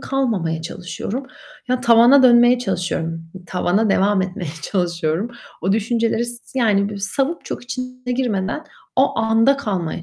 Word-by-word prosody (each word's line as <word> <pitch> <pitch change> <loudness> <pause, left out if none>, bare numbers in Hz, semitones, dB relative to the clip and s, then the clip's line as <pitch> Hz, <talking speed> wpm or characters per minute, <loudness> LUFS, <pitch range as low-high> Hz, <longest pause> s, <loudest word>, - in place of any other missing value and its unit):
kalmamaya 195 -13 -1
çalışıyorum. 195 +9 -5 0.4
Ya, 255 0 0
tavana 240 +4 +6
dönmeye 240 0 +6
çalışıyorum, 165 -6 -3 0.2
tavana 190 +4 +1
devam 195 0 +2
etmeye 180 -3 -5
çalışıyorum. 175 +2 -1 0.3
O 190 +3 +1
düşünceleri 225 +2 0
s 240 +2 -6
yani, 205 -4 +2
böyle, 205 -1 -7
savıp 270 +11 -1
çok - - -6
içine 255 0 -5
girmeden 240 +1 -2 0.3
o 265 +2 +2
anda 225 +5 +3
kalmaya 185 -10 -3
220 Hz, 130 wpm, -20 LUFS, 185-250 Hz, 0.4 s, tavana